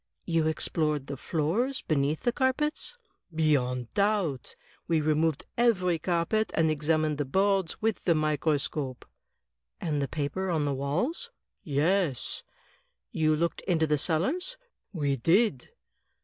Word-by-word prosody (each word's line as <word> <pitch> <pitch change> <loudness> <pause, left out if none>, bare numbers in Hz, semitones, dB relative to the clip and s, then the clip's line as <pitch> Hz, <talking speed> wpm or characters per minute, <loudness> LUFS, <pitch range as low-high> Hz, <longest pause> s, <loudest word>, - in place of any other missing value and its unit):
"You 165 -2 +1
explored 150 -2 0
the 140 - -5
floors 175 - -1
beneath 150 0 0
the 240 - +1
carpets?" 300 - 0 0.4
"Beyond 125 -6 +1
doubt. 200 -10 0 0.3
We 165 -2 +2
removed 155 0 +1
every 185 -8 +3
carpet, 175 +6 0
and 160 -1 +3
examined 155 0 0
the 145 - 0
boards 190 +3 +1
with 220 -4 0
the 170 - +4
microscope." 150 -3 0 0.7
"And 150 -4 -1
the 140 - 0
paper 155 +7 -2
on 160 -4 +1
the 140 - 0
walls?" 180 - -1 0.3
"Yes." 155 - 0 0.7
"You 155 -1 +2
looked 170 +2 -1
into 165 -4 +3
the 150 -1 +1
cellars?" 290 - 0 0.3
"We 145 -6 0
did." 165 - +2
160 Hz, 125 wpm, -28 LUFS, 150-190 Hz, 0.7 s, the